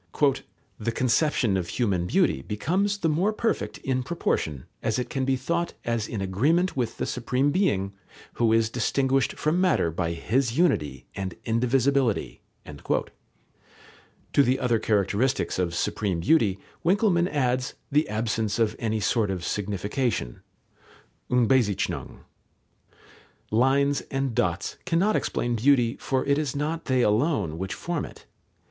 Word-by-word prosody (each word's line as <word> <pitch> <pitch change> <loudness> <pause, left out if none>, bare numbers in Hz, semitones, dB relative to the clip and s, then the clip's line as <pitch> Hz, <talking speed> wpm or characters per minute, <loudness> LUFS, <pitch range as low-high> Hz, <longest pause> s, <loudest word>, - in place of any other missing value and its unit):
"The 115 +2 -1
conception 125 -3 +2
of 90 -2 -3
human 95 -4 0
beauty 65 - +2
becomes 180 - -1
the 180 - 0
more 170 +7 +2
perfect 225 +1 -2
in 130 -1 -1
proportion 80 - -2 0.2
as 110 - 0
it 125 - -3
can 135 -1 -1
be 135 0 +2
thought 170 +7 -2
as 115 -2 -1
in 110 - -4
agreement 145 - +1
with 125 -4 -2
the - - -1
Supreme 125 +3 0
Being, 100 - +1 0.4
who 115 -2 +2
is 115 0 +3
distinguished 135 +3 +1
from 160 +4 0
matter 170 - +2
by 85 0 -2
His 120 +8 0
unity 75 - +1
and 95 -2 -4
indivisibility." 125 +1 +1 0.2
To 70 - -5
the 130 -1 +2
other 120 -3 +1
characteristics 105 +4 0
of 85 -2 -1
supreme 90 -1 -1
beauty, 100 - +3 0.3
Winckelmann 180 -1 +3
adds 130 -3 0 0.2
"the 150 +2 +2
absence 110 -1 -1
of 110 -2 +1
any 110 -1 -1
sort 110 0 +1
of 90 -2 -3
signification" 105 - -2 0.9
(Unbezeichnung). 125 -4 +1 1.3
Lines 135 +5 +3
and 135 -2 -1
dots 85 -3 -1
cannot 180 +5 +2
explain 120 -1 -1
beauty, 120 -1 +3
for 130 -1 -1
it 140 +1 +2
is 145 -4 -2
not 155 +3 -2
they 130 -2 +2
alone 105 - +1
which 95 +2 -3
form 170 -3 -3
it. - - -11
125 Hz, 135 wpm, -26 LUFS, 105-145 Hz, 1.3 s, is